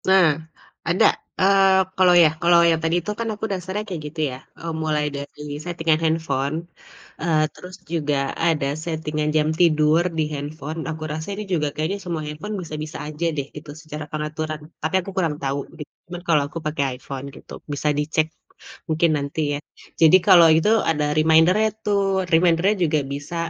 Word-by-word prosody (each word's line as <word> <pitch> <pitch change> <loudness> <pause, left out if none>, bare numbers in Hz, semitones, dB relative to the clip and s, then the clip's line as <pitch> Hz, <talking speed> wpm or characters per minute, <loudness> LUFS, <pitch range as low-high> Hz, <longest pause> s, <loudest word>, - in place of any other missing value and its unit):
Nah, 190 -5 +5 0.5
ada 175 +2 +3 0.4
eee 195 0 +5 0.2
kalau 185 -1 +6
ya 155 - +6
kalau 170 0 +5
yang 165 -1 +1
tadi 165 +1 +1
tuh 210 - -2
kan 230 - -2
aku 210 +1 -4
dasarnya 190 +2 -3
kayak 180 -6 -5
gitu 155 +2 -9
ya, - - -7 0.2
e - - -13 0.2
mulai 150 -1 0
dari 140 +1 -8 0.2
setting-an 165 -2 0
handphone. 155 -3 0 0.6
Eee 155 -2 +2
terus 180 0 -11 0.2
juga 145 -4 0
ada 155 -4 +1 0.2
setting-an 155 -2 -2
jam 155 0 +2
tidur 155 -1 +4 0.2
dihandphone, 150 +1 -4
aku 160 -1 -5
rasa 155 +1 -5
ini 210 - -4
juga 150 -3 +1
kayaknya 160 +6 -1
semua 170 -3 -3
handphone 150 +8 -5
bisa 160 -3 -7
bisa 155 - -7
aja 155 +2 -4
deh 140 -1 -2
gitu 150 0 -9
secara 155 -1 -7
pengaturan, 155 0 -4 0.2
tapi 160 +4 -1
aku - - -6
kurang 165 -5 +1
tahu 140 +1 -1 0.2
di - - -5 0.5
kalau 150 -3 +4
aku 165 - -7
pakai 140 -4 -1
iPhone 135 +1 -7
gitu, - - -13 0.2
bisa 145 +1 -1
dicek 155 +1 +1 0.6
mungkin 160 +1 +2
nanti 140 +2 -3 0.2
ya. - - -7 0.4
Jadi 165 +3 +8
kalau 170 -2 +8
itu 165 +6 +2 0.2
ada 150 -2 +1
reminder-nya 160 +7 +4 0.2
tuh 205 -1 +2 0.3
reminder-nya 170 +4 +4
juga 155 -1 +1
bisa 145 +4 -6
160 Hz, 170 wpm, -22 LUFS, 150-170 Hz, 0.6 s, Jadi